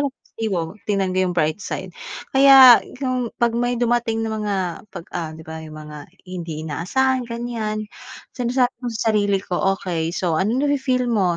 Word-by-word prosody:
lang 265 - -16 0.2
positibo. 220 -5 -1 0.3
Tignan 195 -3 0
ko - - +2
yung 180 - -3
bright 155 +3 +1
side." 185 -1 -5 0.4
Kaya 270 -2 +9 0.2
yung 255 -3 -1
'pag 235 -1 +2
may 245 +1 0
dumating 235 -1 +1
na 220 - -3
mga 210 -2 -2 0.4
'pag 175 -3 -8
ah, 165 -3 -3
'di 160 - -11
ba, 160 0 -7
yung 155 -1 -10
mga 150 -1 -10 0.2
hindi 165 -4 -6
inaasahan, 255 - 0
ganyan. 230 -2 -3 0.5
Sinasabi 250 0 +1
ko 250 - -6
sa 220 - -4
sarili 205 -2 +2
ko 180 - -4 0.2
okey. 170 -3 -3
So, 170 -4 0
anong 230 +8 +1
nafi-feel 260 -3 0
mo? 190 -6 +1
215 Hz, 175 wpm, -21 LUFS, 175-245 Hz, 0.5 s, Kaya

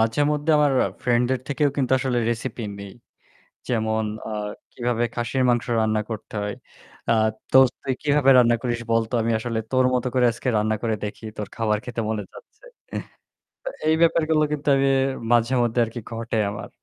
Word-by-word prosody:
মাঝেমধ্যে 145 +7 +1
আমার 145 -2 +3 0.3
ফ্রেন্ডের 125 +1 +1
থেকেও 145 +1 +2
কিন্তু 130 -2 0
আসলে 125 -2 0
রেসিপি 120 0 -4 0.2
নেই। 100 -1 -8 0.8
যেমন 110 -2 0 0.2
আ - - -5 0.4
কিভাবে 120 -1 -1
খাসির 120 +2 -1
মাংস 120 -1 +1
রান্না 110 -1 +1
করতে 110 0 -7
হয়। 105 - -3 0.5
আ - - +4 0.4
দোস্ত 130 -1 +6
তুই 135 -1 0
কিভাবে 145 -2 +3
রান্না 120 -1 +5
করিস 120 -2 -1
বলতো? 115 +1 +1
আমি 115 +1 0
আসলে 115 0 -3
তোর 130 0 +3
মত 125 -1 0
করে 125 -1 +3
আজকে 120 - -7
রান্না 110 +1 +1
করে 115 -2 +1
দেখি, 105 +2 -6
তোর 105 - -4
খাবার 110 -2 +1
খেতে 120 -2 -3
মনে 110 -2 -2
যাচ্ছে। - - -16 1.0
তো - - -9 0.2
এই 160 - +4
ব্যাপারগুলো 160 -2 +3
কিন্তু 150 0 -4
আমি 135 0 +2 0.5
মাঝেমধ্যে 120 0 +2
আরকি 115 +2 -7
ঘটে 115 -1 -3
আমার। 105 - -7
120 Hz, 165 wpm, -23 LUFS, 115-130 Hz, 1.0 s, দোস্ত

